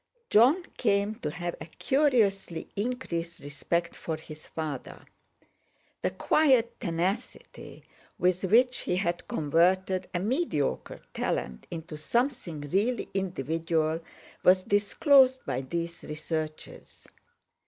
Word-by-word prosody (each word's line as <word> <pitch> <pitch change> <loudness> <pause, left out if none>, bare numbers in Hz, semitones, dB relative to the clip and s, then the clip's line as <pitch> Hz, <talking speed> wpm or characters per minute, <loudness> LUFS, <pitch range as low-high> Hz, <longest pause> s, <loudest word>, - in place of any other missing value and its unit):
Jon 260 - +6
came 205 -2 +2
to 150 - -2
have 175 +2 -4
a - - -7
curiously 215 - +1
increased 195 -7 -3
respect 170 +4 -2
for 160 -1 -4
his 155 -1 -12
father. 155 -5 -6 1.0
The - - +1
quiet 260 -6 +2
tenacity 185 +4 -4 0.3
with 180 +1 +1
which 250 +6 +4
he 180 - -1
had 175 -2 -1
converted 185 +5 +1
a 180 - -1
mediocre 205 - -1
talent 65 -1 -3
into 160 -2 -7
something 235 - -1
really 200 - 0
individual 165 -3 -1 0.4
was 185 +1 +5
disclosed 260 - +4
by 125 - -2
these 170 +5 -4
researches. 155 0 -6
180 Hz, 105 wpm, -28 LUFS, 160-225 Hz, 1.0 s, Jon